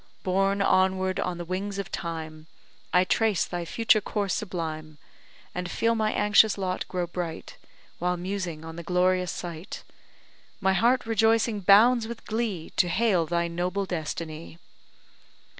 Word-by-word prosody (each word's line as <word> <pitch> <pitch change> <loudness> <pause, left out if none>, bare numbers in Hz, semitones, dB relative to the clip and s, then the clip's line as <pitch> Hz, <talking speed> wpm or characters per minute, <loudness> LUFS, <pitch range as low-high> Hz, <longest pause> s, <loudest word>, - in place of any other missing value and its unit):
Borne 195 +2 +1
onward 190 0 +2
on 180 -1 -2
the 175 - -6
wings 195 +3 -3
of 200 -1 -5
Time, 160 -2 -6 0.4
I 180 - +5
trace 215 0 +1
thy 175 -1 -4
future 220 +3 +3
course 205 -1 -2
sublime; 160 -5 -4 0.6
And 180 0 -4
feel 230 +4 +1
my 215 -1 0
anxious 210 0 +4
lot 185 -2 -2
grow 180 -1 -2
bright, 170 -2 -6 0.4
While 180 +1 0
musing 175 -3 -4
on 165 0 -8
the - - -5
glorious 180 +1 +1
sight; 170 +2 -7 0.8
My 190 -1 +2
heart 235 +6 +2
rejoicing 225 0 +2
bounds 220 +5 +5
with 235 0 -8
glee 215 -7 -3
To 180 - +4
hail 185 -4 +2
thy 170 0 0
noble 180 +4 -2
destiny! 160 -2 -5
185 Hz, 140 wpm, -26 LUFS, 170-205 Hz, 0.8 s, I